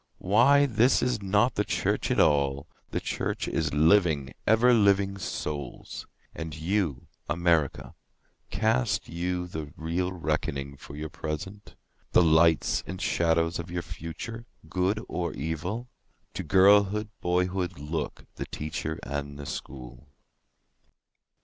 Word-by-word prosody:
Why 125 +9 +5
this 120 0 +3
is 125 -3 0
not 105 +5 +2
the 105 - 0
church - - -1
at - - +1
all—the 70 0 0
Church - - -2
is 80 -3 -1
living, 80 -3 +3
ever 115 +3 +5
living 100 -3 +3
Souls.")And 75 0 -6
you, 85 -6 -1 0.2
America, 85 -4 +1 0.6
Cast 65 -1 +1
you 90 +1 -2
the 80 -4 -6
real 85 +3 -1
reckoning 75 -5 -2
for 70 +1 -11
your 75 0 -6
present? 90 +9 -6 0.4
The - - +6
lights 80 0 +4
and 95 - -6
shadows 85 -1 +1
of 85 +1 -6
your 85 0 -3
future—good 95 +2 -4
or 85 -2 -3
evil? 85 - -4 0.5
To - - -3
girlhood, 100 +2 +4
boyhood 90 0 0
look—the 75 +2 -5
Teacher 80 +1 -4
and 70 0 -4
the 70 - -7
School. 65 -1 -8
85 Hz, 115 wpm, -27 LUFS, 75-100 Hz, 0.6 s, The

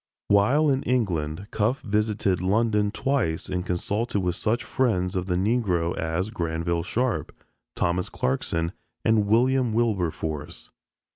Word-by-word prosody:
While 125 +10 +4
in 135 0 +1
England, 90 -9 -1
Cuffe 110 +5 0
visited 105 -4 0
London 105 +2 +2
twice 110 -8 -1
and 90 -1 -2
consulted 95 +1 -1
such 110 +6 -1
friends 95 -8 0
of 90 0 -1
the 90 - 0
Negro 95 -4 +1
as 80 +6 -2
Granville 85 -3 -1
Sharp, 120 +6 -1 0.4
Thomas 90 +1 0
Clarkson 80 +6 -1 0.3
and 110 -2 +3
William 125 +2 +3
Wilberforce! 85 -8 -2
100 Hz, 120 wpm, -25 LUFS, 85-115 Hz, 0.4 s, While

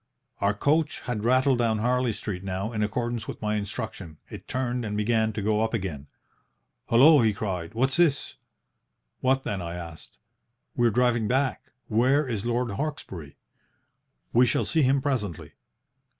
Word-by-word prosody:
"Our 100 +1 +1
coach 150 +6 +1
had 110 -4 -4
rattled 130 +2 +3
down 115 -2 +2
Harley 125 +2 +1
Street 100 -3 -5
now, 95 +3 -3
in 105 - -2
accordance 120 +2 -2
with - - -6
my 105 0 -1
instruction, 100 -5 -5
it - - -9
turned 125 -1 -2
and 105 -1 -3
began 110 +1 +1
to 105 -1 -4
go 105 +1 +1
up 110 +1 0
again. 80 -9 -4 0.8
"'Hullo!' 140 +5 +7
he 110 -2 +3
cried. 95 -2 -4
'What's 130 +4 +1
this?' 165 -5 +2 0.8
"'What 130 +1 +1
then? 100 -3 -3
'I 85 0 -5
asked. 85 -2 -10 0.6
"'We 120 -1 +3
are - - +4
driving 120 -1 +2
back. 130 0 0 0.2
Where 130 +6 +2
is 115 -2 -3
Lord 120 -1 0
Hawkesbury?' 100 - -5 1.0
"'We 125 +2 +5
shall - - +1
see 160 - +1
him 135 0 +2
presently.' 110 - -2
115 Hz, 160 wpm, -26 LUFS, 105-130 Hz, 1.0 s, Hullo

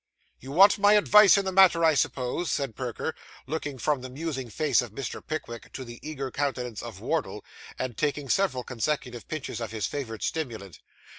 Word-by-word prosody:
'You 135 - -9
want 200 +6 +6
my 205 +1 +6
advice 210 -1 +7
in 200 - 0
this 190 - -2
matter, 180 -3 +6
I 160 - +5
suppose?' 140 +4 -1
said 135 -6 -2
Perker, 125 -3 -4 0.3
looking 145 -1 -4
from 135 +3 0
the 130 - -7
musing 135 -2 -4
face 145 +2 +2
of 120 - -6
Mr. 130 +6 -6
Pickwick 140 -7 -6
to 130 - -6
the 120 0 -10
eager 140 -4 -5
countenance 125 -6 -2
of - - -9
Wardle, - - -2 0.3
and 125 -3 -3
taking 145 0 -1
several 185 -8 +1
consecutive 125 -1 -3
pinches 155 -5 -5
of 115 - -3
his 110 -2 -3
favourite 115 -7 -5
stimulant. 110 - -4
140 Hz, 180 wpm, -27 LUFS, 125-160 Hz, 0.3 s, advice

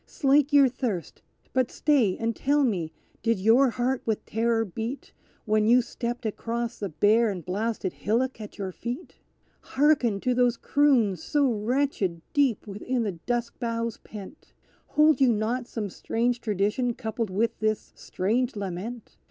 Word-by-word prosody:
Slake 285 +1 +2
your 285 -2 +7
thirst, 235 - -4 0.3
but 255 -2 +2
stay 255 -11 +2
and 230 0 -1
tell 290 +1 +2
me: 180 -11 0 0.3
did 230 -2 +1
your 235 +7 +5
heart 245 +2 -1
with 220 -2 -2
terror 225 0 +1
beat, 225 +7 -6 0.3
When 215 0 +2
you 245 +2 +5
stepped 240 0 -5
across 235 +2 -3
the 200 - -3
bare 215 +7 +3
and 180 -5 -5
blasted 200 +1 -2
hillock 235 +3 -1
at 210 - -9
your 195 -2 -4
feet? 245 - -7 0.4
Hearken 265 -7 +2
to 250 - +1
these 245 -1 +2
croons 240 - +2
so 280 -4 +2
wretched 215 - -1
deep 275 -6 +2
within 225 +4 -2
the 210 - -1
dusk 235 +7 -3
boughs 230 -1 -2
pent! 210 +7 -11 0.3
Hold 305 -1 +4
you 260 -2 +6
not 230 +3 -1
some 210 -6 -4
strange 240 +4 -1
tradition 215 +3 0
coupled 225 -2 -3
with 215 +5 -1
this 215 0 -1
strange 235 +7 -1
lament? 205 +4 -6
230 Hz, 150 wpm, -26 LUFS, 210-255 Hz, 0.4 s, your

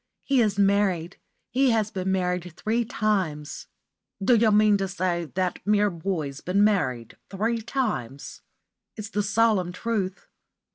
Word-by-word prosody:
He 270 -3 +2
is 210 -3 +1
married. 195 -4 +1 0.3
He 265 +1 +3
has 220 -2 +1
been 190 -2 -2
married 180 -2 -1
three 230 +2 0
times." 185 -10 -2 0.5
"D' 195 +5 +1
you 225 -1 +4
mean 210 0 +5
to 195 0 -2
say 180 -3 -1
that 185 -1 -1
mere 205 0 +2
boy's 160 -5 -4
been 195 +3 +2
married 130 - 0
three 225 +4 -1
times?" 215 - -4 0.6
"It's 215 0 -7
the 205 - 0
solemn 205 -3 +2
truth." 195 -1 -3
200 Hz, 140 wpm, -25 LUFS, 180-215 Hz, 0.6 s, mean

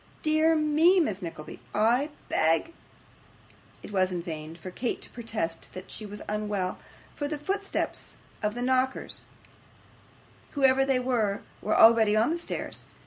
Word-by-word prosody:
'Dear 315 +1 +4
me, 315 +4 +4
Miss 210 - 0
Nickleby, 165 -3 -7 0.2
I 240 +7 +3 0.2
beg 165 - +2 0.5
' - - -28
It - - -9
was 185 -2 +2
in 175 -2 -3
vain 160 -1 -6
for 180 +2 -8
Kate 240 +6 -2
to - - -10
protest 220 -9 -4
that 185 +1 -8
she 215 - -6
was 205 +1 -8
unwell, 205 -3 -2 0.3
for 290 - -3
the 300 0 -3
footsteps 395 +7 -3 0.2
of 210 +1 -1
the 245 - -3
knockers, 260 +1 0 1.3
whoever 270 -1 +4
they 270 -1 +2
were, 235 -6 0 0.2
were 215 - +1
already 225 -2 +7
on 225 +7 +3
the 340 - -1
stairs. 340 - -5
230 Hz, 150 wpm, -28 LUFS, 195-290 Hz, 1.3 s, already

